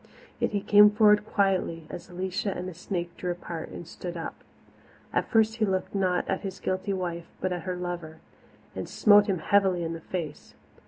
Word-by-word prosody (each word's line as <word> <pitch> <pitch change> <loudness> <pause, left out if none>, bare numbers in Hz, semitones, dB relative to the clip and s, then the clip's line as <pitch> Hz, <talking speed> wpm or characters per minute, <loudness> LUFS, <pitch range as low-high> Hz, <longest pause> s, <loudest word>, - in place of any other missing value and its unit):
Yet - - +1
he 205 -2 -1
came 210 +1 +7
forward 210 0 +4
quietly 185 -6 +1
as 175 - -8
Alicia 185 +2 -2
and 180 +1 -4
the 185 - -6
snake 175 0 -4
drew 180 - -3
apart 170 -2 -6
and 175 - -8
stood 175 0 -6
up. 165 - -4 0.8
At - - 0
first 220 -1 +3
he 225 - +1
looked 190 -2 -1
not 185 -3 +1
at 190 - -1
his 190 -2 -6
guilty 185 +2 -2
wife 175 -3 -3
but 185 -1 -1
at 175 -2 -5
her 180 - -1
lover, 175 -3 -5 0.6
and - - -5
smote 205 -1 +6
him 195 -2 +1
heavily 190 0 +2
in 165 0 -2
the 165 - -7
face. 160 -4 -6
185 Hz, 195 wpm, -27 LUFS, 175-200 Hz, 0.8 s, came